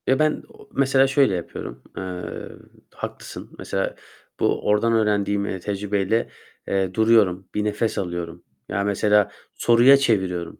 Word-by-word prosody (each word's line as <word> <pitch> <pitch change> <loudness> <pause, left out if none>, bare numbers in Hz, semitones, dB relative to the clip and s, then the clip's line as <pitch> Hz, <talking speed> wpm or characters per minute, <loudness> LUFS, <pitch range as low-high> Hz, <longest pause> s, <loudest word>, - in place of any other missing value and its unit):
Ya, 130 - +3
ben 155 0 +1
o - - -17
mesela 135 0 +3
şöyle 135 -7 +3
yapıyorum: 85 - -7
Eee, 90 -1 -5 0.7
haklısın, - - -7
mesela, - - -3 0.4
bu - - 0
ordan 105 +3 +3
öğrendiğim, 105 -2 +1
eee, 95 -2 -4
tecrübeyle, 100 +3 -1 0.4
eee, 95 -2 0
duruyorum, 105 -4 +3
bir 105 - 0
nefes 105 +2 -1
alıyorum. 85 -2 -4 0.3
Ya, 100 - -1
mesela 105 0 +2 0.2
soruya 120 +4 +6
çeviriyorum. 95 -10 -1
105 Hz, 130 wpm, -23 LUFS, 95-115 Hz, 0.7 s, soruya